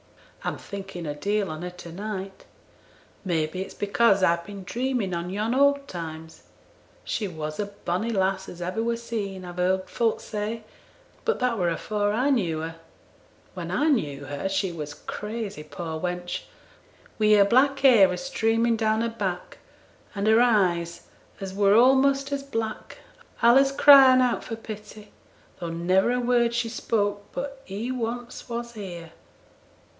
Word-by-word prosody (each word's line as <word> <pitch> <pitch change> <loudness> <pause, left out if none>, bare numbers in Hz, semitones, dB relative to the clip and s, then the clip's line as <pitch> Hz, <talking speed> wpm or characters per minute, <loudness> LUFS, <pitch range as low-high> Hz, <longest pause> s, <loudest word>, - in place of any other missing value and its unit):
I'm - - -2
thinking 195 -3 -7
a 145 - -3
deal 200 +5 -1
on 155 +1 -6
her 180 - -4
to 175 -1 -11
night; 195 +1 -6 0.8
may 165 -4 +1
be 170 +4 -5
it's 190 - -7
because 200 -1 +3
I've 170 -1 +3
been 200 +1 -9
dreaming 240 -2 -2
on 170 +1 -3
yon 210 +5 -1
old 280 +1 +3
times. 160 -2 -8 0.6
She 210 - -2
was 155 -2 -6
a 205 - -1
bonny 200 +1 -3
lass 190 -2 0
as 175 - -10
ever 185 +5 -2
were 230 0 0
seen, 205 -5 -5
I've 175 0 -9
heerd 185 +1 +1
folk 230 -2 0
say; 215 +1 -4 0.6
but 460 - +1
that 245 -3 0
were 175 -1 +2
afore 205 +5 -1
I 255 +6 +2
knew 170 - 0
her. 165 +1 -6 0.8
When - - -6
I 305 +2 +1
knew 145 - 0
her 145 +7 -3
she 195 -1 0
were 155 -3 -5 0.2
crazy, 210 -4 -5
poor 160 +1 -6
wench; 180 0 -3 0.7
wi' 215 0 +5
her 200 -1 +6
black 265 +6 +4
hair 230 -9 +7
a 180 - -3
streaming 230 -2 +1
down 220 0 +1
her 230 - 0
back, 195 -6 -4 0.6
and 200 0 -2
her 220 +2 +5
eyes, 180 -8 +2 0.4
as 195 -1 -6
were 200 0 +4
a'most 270 +3 +4
as 280 0 -1
black, 225 -6 -5 0.5
allays 270 +4 +6
crying 270 -2 +8
out 250 -1 +1
for 225 - -5
pity, 210 -1 -10 0.5
though 170 -2 -4
never 180 +6 +2
a 250 - +1
word 240 -1 +2
she 235 -1 0
spoke 205 -3 -1
but 275 0 -5
"He 210 +6 -4
once 245 0 -5
was 235 0 -4
here." 175 -6 -8
205 Hz, 160 wpm, -25 LUFS, 180-235 Hz, 0.8 s, crying